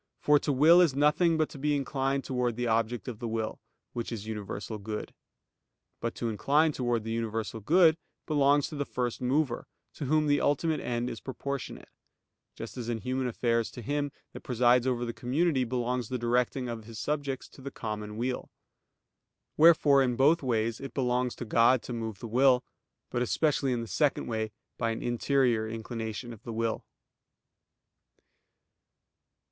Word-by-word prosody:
For 150 0 +4
to 145 - -1
will 160 +6 +7
is 160 -7 +3
nothing 150 +4 +3
but 155 -1 +2
to 140 - -10
be 150 +1 +1
inclined 135 -1 -1
towards 125 -3 -1
the 120 - -1
object 115 +1 0
of 120 -4 -5
the 120 - -4
will, 110 -1 -3 0.3
which 120 0 -4
is 110 -3 -5
universal 105 0 -5
good. 105 +1 -5 0.9
But 115 - -3
to 120 - -3
incline 145 +9 +2
towards 120 -5 -1
the 115 - -3
universal 115 -1 -3
good 160 - +5 0.3
belongs 145 -1 +3
to - - -7
the 145 - -1
First 125 -3 -3
Mover, 130 0 0 0.3
to 150 - -5
Whom 155 +3 +2
the 145 -1 +2
ultimate 155 +2 +1
end 120 0 -2
is 115 - -5
proportionate; 140 +1 -5 0.7
just 115 +3 -8
as 120 -2 -4
in 115 -2 -2
human 130 0 -1
affairs 115 -1 0
to 120 - -9
him 145 +3 -1 0.2
that - - -8
presides 125 0 +3
over 120 -1 0
the 115 - -4
community 135 +3 +1
belongs 125 -1 -2
the 130 - -1
directing 125 +2 0
of 115 -2 -6
his 115 0 -10
subjects 140 0 -2
to - - -15
the 140 - -5
common 105 -4 -5
weal. 125 +2 -2 1.1
Wherefore 150 -3 +6
in 125 -2 +1
both 150 +7 +4
ways 115 -3 0
it 135 - -8
belongs 125 -1 0
to 120 - -6
God 115 +3 +4
to 125 - -6
move 110 -3 -4
the 115 - -7
will; 125 +2 +4 0.5
but 120 - -1
especially 140 +1 +1
in 120 -1 0
the 115 - -6
second 145 +4 +1
way 110 -1 -2 0.3
by 115 - +1
an 115 - -3
interior 120 -2 +1
inclination 115 +1 -5
of 110 - -13
the 115 - -7
will. 115 0 -2
125 Hz, 175 wpm, -29 LUFS, 115-140 Hz, 1.1 s, will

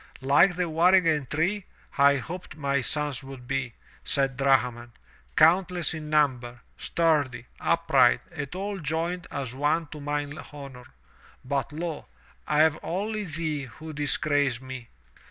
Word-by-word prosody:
"Like 145 +7 +5
the 180 0 0
waringen 165 -3 +3
tree, 180 +6 0 0.3
I 140 -1 +5
hoped 175 +6 -6
my 140 -2 0
sons 145 -1 -2
would 135 -2 -10
be," 135 -3 -2 0.3
said 135 -2 +1
Drahman, 125 -3 +1 0.4
"countless 175 +2 +4
in 155 -1 -6
number, 125 -6 +1
sturdy, 150 -8 0
upright 160 -7 +3
and 150 -1 -6
all 200 +1 -3
joined 165 +3 -2
as 130 -3 -4
one 150 +5 +1
to 150 -1 -9
mine 145 +1 -3
honor. 135 -4 -10 0.6
But 140 +1 -1
lo! 160 0 -5 0.4
I 150 0 +3
have 155 -1 +3
only 210 +4 -2
thee 155 -3 -3
who 155 +6 -10
disgrace 145 -3 +1
me. 130 -2 -8
150 Hz, 135 wpm, -27 LUFS, 135-165 Hz, 0.6 s, Like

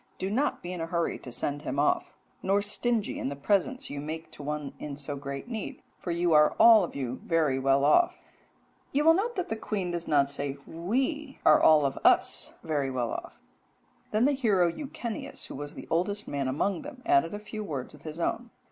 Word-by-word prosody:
Do 190 +1 -3
not 270 +7 0
be 175 +1 -4
in 175 - -5
a 165 - -2
hurry 170 0 -1
to 125 - -9
send 145 +4 -2
him 140 - -4
off, 145 - +1 0.3
nor 200 +2 +2
stingy 220 +1 0
in - - -2
the 140 - -4
presents 200 - 0
you 145 - -4
make 160 +2 -6
to - - -10
one 150 -1 -4
in 140 -2 -6
so 145 0 -5
great 140 +5 -6
need; 225 -4 -6 0.2
for - - -6
you 170 0 +1
are 150 0 +5
all 225 -2 +8
of 175 - -5
you 130 -2 -4
very 155 -6 +1
well 135 +1 +3
off.'" 350 - +4 0.7
You 290 +2 +1
will 325 - +8
note 445 +7 0
that 365 -3 -2
the 220 - -1
queen 200 -5 -3
does 170 -1 -4
not 140 -2 +3
say 140 -1 -3
"we 265 - -2
are 155 - +7
all 155 -2 +6
of 135 - -1
us - - +3
very 145 -4 -1
well 125 -3 -2
off." - - -7 0.7
"Then 215 +3 +2
the 285 - +4
hero 205 -11 +2
Echeneus, 240 - -6
who - - -9
was 145 +1 -7
the - - -8
oldest 200 +5 0
man 140 -2 -2
among 170 +8 0
them, 270 -3 -10
added 345 -10 +3
a - - -3
few 215 0 -6
words 140 -9 -5
of 150 - -15
his 155 +2 -7
own. 230 +7 -1
170 Hz, 215 wpm, -28 LUFS, 145-220 Hz, 0.7 s, all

